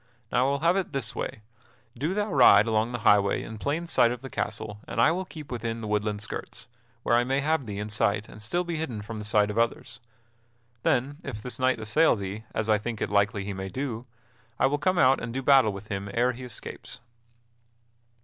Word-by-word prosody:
Now 125 +2 +3
I - - +2
will 140 0 0
have 170 +2 +3
it 195 - -2
this 130 -6 -3
way; 110 - -5 0.5
do 150 +10 -2
thou 210 -2 -1
ride 110 -6 +7
along 110 +1 +1
the 120 -2 -4
highway 100 -1 +4
in 110 -1 -8
plain 150 +8 -1
sight 160 -8 +4
of 125 +1 -6
the 135 - -8
castle, 105 0 -4
and - - -4
I 120 - +6
will 185 +3 -2
keep 155 -6 -10
within 115 -1 -3
the 110 - -5
woodland 105 0 -1
skirts, 110 - -7 0.4
where 120 - +3
I 120 - +4
may 135 +2 0
have 155 -3 0
thee 100 -1 -5
in 105 +1 -3
sight 105 0 0
and 105 - -12
still 175 +12 0
be 170 -2 -3
hidden 125 -10 -4
from 110 +1 -7
the - - -5
sight 105 0 +2
of 110 - -1
others. 115 -1 -1 0.8
Then 140 +6 0
if 130 -10 -6
this 125 - -6
knight 130 -2 +2
assail 115 +10 +3
thee, 100 +2 -6
as 110 - -2
I 110 -1 +3
think 110 +1 -4
it - - -2
likely 100 0 +2
he 100 - -3
may 95 0 -5
do, 125 +1 -4 0.5
I - - +3
will 145 +2 +1
come 185 +2 +1
out 135 -3 +5
and 115 - -4
do 135 +3 -3
battle 135 -5 +5
with 100 +2 -9
him 100 -1 -4
ere 125 +1 +2
he 125 +1 -9
escapes." 125 0 -8
115 Hz, 225 wpm, -27 LUFS, 105-135 Hz, 0.8 s, ride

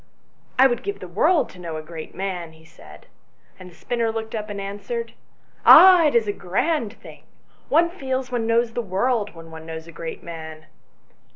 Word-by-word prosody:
" - - -36
I 260 - +7
would 240 -3 +2
give 405 0 -5
the - - -8
world 355 -5 +2
to 180 - -15
know 165 -3 -6
a 155 - -7
great 160 0 -9
man," 180 -3 -4
he 160 0 -19
said, 75 - -16 0.5
and 185 0 -11
the 170 - -19
spinner 230 +3 -2
looked 220 0 -5
up 215 -1 -4
and 205 -1 -5
answered 205 - -5 0.5
"Ah! 365 -3 +9
it 290 - 0
is 225 -2 +3
a 205 - 0
grand 215 - -1
thing; - - -14 0.5
one 330 +3 +4
feels 265 -6 -4
one 235 -2 -1
knows 230 0 +1
the 240 - -1
world 210 +1 -1
when 165 0 -12
one 160 0 -10
knows 160 0 -7
a 170 - -12
great 165 0 -7
man." 160 -2 -9
205 Hz, 200 wpm, -23 LUFS, 165-245 Hz, 0.5 s, Ah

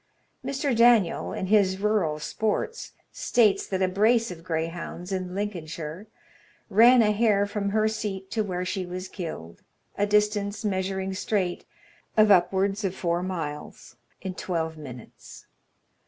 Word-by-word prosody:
Mr. 275 -1 -1
Daniel, 230 -6 +4
in - - -3
his 190 -2 +3
"Rural 200 -7 +1
Sports," 215 - -3 0.2
states 215 -5 +2
that 190 -1 -1
a - - +3
brace 220 +4 +2
of 165 -2 -9
greyhounds, 170 +2 -4
in 185 -1 -3
Lincolnshire, 170 -2 -5 0.6
ran 235 +4 +7
a 210 - +3
hare 210 -2 +3
from 205 0 -2
her 215 +1 +2
seat 200 -3 -4
to 225 - 0
where 180 -2 -3
she 190 0 -2
was 180 +1 -6
killed, 155 - -7 0.4
a 205 - +2
distance, 210 0 +1
measuring 190 -1 -1
straight, 190 -2 -1 0.5
of 215 -1 +6
upwards 195 +3 +3
of 190 -1 -1
four 170 0 -1
miles, 160 -8 -6 0.3
in 190 -1 -3
twelve 165 -3 -3
minutes. 130 -6 -11
190 Hz, 140 wpm, -26 LUFS, 180-210 Hz, 0.6 s, ran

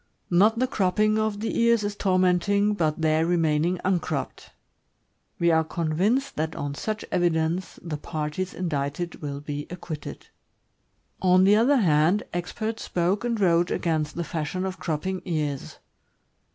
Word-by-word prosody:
Not 210 +6 +4
the 255 - +2
cropping 215 -1 +1
of 215 -1 -1
the 225 - -1
ears 235 -2 +4
is 205 0 -2
tormenting, 190 +2 +2
but 160 -5 -1
their 155 0 +3
remaining 165 0 +1
uncropped. 165 -7 -2 0.9
We 170 0 +3
are 160 0 +4
convinced 180 - 0
that 160 +1 -2
on 145 0 -3
such 215 +8 -4
evidence 175 0 0
the 165 -3 -4
parties 155 +4 -4
indicted 165 0 -3
will 140 -1 -5
be 145 0 -5
acquitted. 170 -3 -7 1.0
On 185 0 +5
the 200 +2 +6
other 250 +6 +4
hand, 170 -1 +3
experts 215 +6 -3
spoke 180 +4 0
and 235 -2 -1
wrote 175 -2 +3
against 155 -3 -1
the 170 - -2
fashion 170 +3 -3
of 190 0 -5
cropping 185 +4 -2
ears. 150 -6 -3
175 Hz, 140 wpm, -25 LUFS, 155-200 Hz, 1.0 s, the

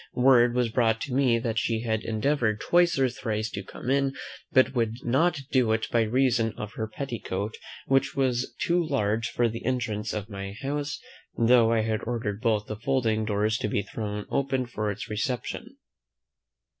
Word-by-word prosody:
Word 125 -1 +5
was 125 -2 +2
brought 115 +2 +1
me 125 -2 +3
that 115 -1 -1
she 115 -1 -1
had 110 -2 -1
endeavoured 115 -1 0
twice 175 +2 +3
or 135 -1 +3
thrice 110 -2 -3
to 100 - -4
come 120 +6 -5
in, 135 0 +1 0.4
but 130 0 +4
could 115 -3 0
not 140 +5 +2
do 125 -4 +3
it 110 0 0
by 120 - +3
reason 115 -1 +2
of 105 0 -6
her 110 - -3
petticoat, 110 -4 -4 0.3
which 135 0 +2
was 130 -2 0
too 175 0 +2
large 115 -7 0
for 120 0 +1
the 115 0 -5
entrance 115 -4 -1
of 105 -1 -4
my 100 -2 -6
house, 145 +1 -2 0.4
though 115 -1 +5
I 115 -1 +3
had 110 0 -1
ordered 115 -3 -3
both 110 -3 +1
the 110 - -6
folding 115 -4 +1
doors 105 +1 0
to - - -1
be 100 -1 0
thrown 105 0 -5
open 135 -2 0
for 110 -3 -3
its 100 +1 -5
reception. 130 - -4
115 Hz, 175 wpm, -27 LUFS, 110-130 Hz, 0.4 s, Word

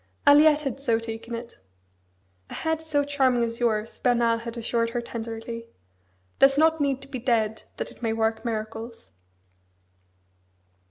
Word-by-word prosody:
Aliette 300 +1 +6
had 275 -1 -3
so 240 -5 +2
taken 230 +1 -6
it. 235 0 -9 0.9
"A - - -7
head 320 0 -1
so 305 -3 0
charming 265 -4 +2
as 230 0 -3
yours," 225 -2 -1
Bernard 235 -2 +2
had 235 +1 -7
assured 230 0 0
her 240 +1 -2
tenderly, 230 0 -6 0.7
"does 275 0 +6
not 320 0 +4
need 275 -2 0
to - - -11
be 265 -2 -5
dead 225 -3 0 0.2
that - - -4
it - - -17
may 225 -2 0
work 225 0 0
miracles!" 225 0 -5
235 Hz, 150 wpm, -26 LUFS, 230-275 Hz, 0.9 s, Aliette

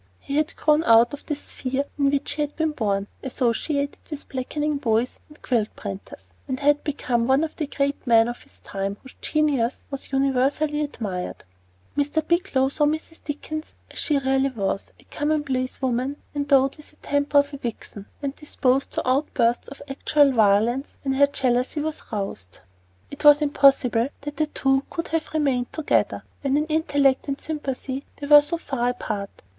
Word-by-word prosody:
He 280 - -5
had 305 0 0
grown 305 +1 +3
out 230 +2 +6
of 290 - -9
the 295 - -1
sphere 275 -1 -3
in 280 -1 +2
which 280 0 -1
he 300 - -2
had 295 0 -2
been 320 -1 0
born, 200 -7 -1
"associated 280 +3 -1
with 300 -3 -6
blacking 295 +3 -2
boys 235 -2 0
and 300 - -17
quilt 230 -4 0
printers," 195 0 -8 0.2
and 260 -1 -2
had 290 0 +3
become 245 -5 0
one 265 +3 +4
of 320 - -4
the 305 - -3
great 280 -1 -2
men 230 -1 +6
of 240 0 -5
his - - -17
time, 195 +1 -4
whose 265 - -13
genius 280 -6 +1
was 275 -1 -6
universally 275 +3 +1
admired. 205 -11 -4 0.5
Mr. 295 +2 0
Bigelow 340 -7 +2
saw 295 +2 +1
Mrs. 315 +2 -4
Dickens 310 +1 -5 0.2
as - - -5
she 295 - +2
really 270 0 +2
was 200 -5 -3
a - - -19
commonplace 290 -4 -2
woman 260 +2 0 0.2
endowed 275 -1 +2
with 300 - -12
the - - -24
temper 285 -1 0
of 285 0 +3
a - - -4
vixen, 220 -5 -7 0.2
and 275 -1 -1
disposed 275 -3 0
to - - -2
outbursts 255 -3 +1
of 280 0 -10
actual 280 +1 +3
violence 225 +4 +2
when 270 -1 0
her 280 +1 +5
jealousy 255 +1 0
was 310 +1 -3
roused. 195 - -4 0.5
It 285 - -8
was 295 -1 +8
impossible 275 -5 +4
that 290 0 -6
the 310 - +1
two 270 -2 +1
could 335 - -4
have 325 0 -2
remained 265 -5 +1
together, 315 -2 0 0.2
when 275 0 +1
in 300 - +1
intellect 285 -4 +2
and 275 0 -2
sympathy 275 -3 -4
they 285 - -7
were 295 0 +9
so 315 +4 -3
far 265 -6 -1
apart. 210 -5 -5
275 Hz, 175 wpm, -24 LUFS, 250-295 Hz, 0.5 s, were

